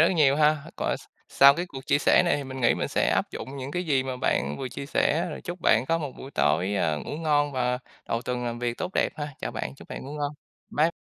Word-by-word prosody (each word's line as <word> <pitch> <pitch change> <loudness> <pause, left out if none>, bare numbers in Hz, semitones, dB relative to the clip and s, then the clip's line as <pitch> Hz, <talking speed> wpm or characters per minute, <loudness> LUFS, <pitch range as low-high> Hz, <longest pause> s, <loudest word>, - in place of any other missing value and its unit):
rất 165 - +6
nhiều 140 -3 +5
ha. 155 0 +4 0.2
Còn - - 0
s - - -14 0.3
sau 140 +1 +8
cái 175 +3 -3
cuộc 135 -6 -9
chia 145 0 +3
sẻ - - +5
này 175 - +2
thì 145 - -4
mình 130 0 -7
nghĩ 120 - +4
mình - - -2
sẽ - - +1
áp - - +1
dụng 135 +2 -7
những 135 +1 -5
cái 180 +3 -2
gì 140 -5 +2
mà 130 -1 -4
bạn 70 - 0
vừa 130 - -3
chia 140 - -7
sẻ, 165 +4 +1
rồi 150 - -6
chúc 175 0 -5
bạn 115 -1 +3
có 165 +3 +2
một 145 -5 -4
buổi 135 - -8
tối, 95 - +1
ơ, 80 -6 +1
ngủ 145 - -5
ngon 145 -2 +1
và 125 -1 0 0.3
đầu 115 +1 -1
tuần 125 -1 -2
làm 120 0 -3
việc 120 -1 -2
tốt 185 - -3
đẹp - - +3
ha. 150 -1 -3
Chào - - -3
bạn, 65 - -4
chúc - - -14
bạn - - -6
ngủ 140 - -7
ngon. 145 -1 -2 0.4
Bye 160 +3 +3
140 Hz, 275 wpm, -26 LUFS, 125-150 Hz, 0.4 s, sau